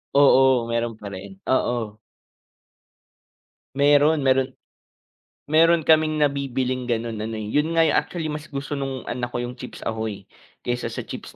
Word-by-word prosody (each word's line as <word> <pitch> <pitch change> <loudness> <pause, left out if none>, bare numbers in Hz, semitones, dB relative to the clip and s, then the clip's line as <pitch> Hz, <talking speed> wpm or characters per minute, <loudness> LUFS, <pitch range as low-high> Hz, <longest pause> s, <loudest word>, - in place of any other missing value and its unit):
Oo, 135 -3 +5
meron 115 -1 -1
pa 105 -2 -9
rin. 95 0 -10
Oo. 120 -4 -1 1.8
Meron, 145 +1 +4
meron 130 0 +3 1.1
meron 165 +1 +5
kaming 155 0 +5
nabibiling 135 -3 -1
gano'n 115 -1 -2
ano, 110 +1 -4
eh, 110 0 -5
yun 150 +2 +2
nga 165 - +5
yung 160 - +3
actually 160 -3 -5
mas 150 +1 -6
gusto 140 0 -5
no'ng 135 -2 -4
anak 120 -1 -3
ko 120 - -5
yung 125 +1 -6
chips 125 - -9
ahoy, 110 -3 -4 0.4
kaysa 120 0 -2
sa - - -5
chips - - -9
130 Hz, 150 wpm, -23 LUFS, 115-145 Hz, 1.8 s, Oo